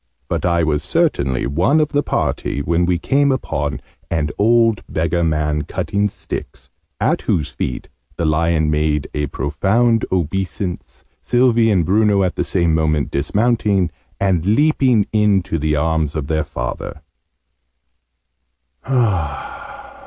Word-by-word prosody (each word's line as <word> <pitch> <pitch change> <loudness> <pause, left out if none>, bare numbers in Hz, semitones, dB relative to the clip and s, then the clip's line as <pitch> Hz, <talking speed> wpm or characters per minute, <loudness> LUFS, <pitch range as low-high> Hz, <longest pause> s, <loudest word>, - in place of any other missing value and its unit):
But - - -1
I 85 -1 +2
was 75 -2 0
certainly 70 - 0
one 90 - +2
of 150 -1 +1
the 145 -1 +1
party 70 - -2
when 85 +2 +1
we 90 -1 +2
came 140 +9 +2
upon 75 - -2 0.3
an 75 -3 -1
old 115 0 +3
beggar 85 +2 0
man 75 -2 0
cutting 100 +6 -1
sticks, - - -8 0.3
at - - +1
whose 75 - 0
feet 65 - -4 0.3
the 85 - -1
lion 80 0 +1
made 75 -1 0
a 75 -1 -1
profound 105 - +1
obeisance, 95 +1 -3 0.2
Sylvie 120 -2 +3
and 95 -6 +2
Bruno 100 +1 +3
at 90 - -1
the - - 0
same 85 -4 +1
moment 75 -2 0
dismounting, 100 - +1 0.3
and 95 -5 +1
leaping 125 - +3
in 105 -3 +3
to 80 - -3
the 75 +1 0
arms 80 0 0
of 75 -3 -2
their 80 0 -1
father. 75 - -5
85 Hz, 130 wpm, -19 LUFS, 75-105 Hz, 0.3 s, old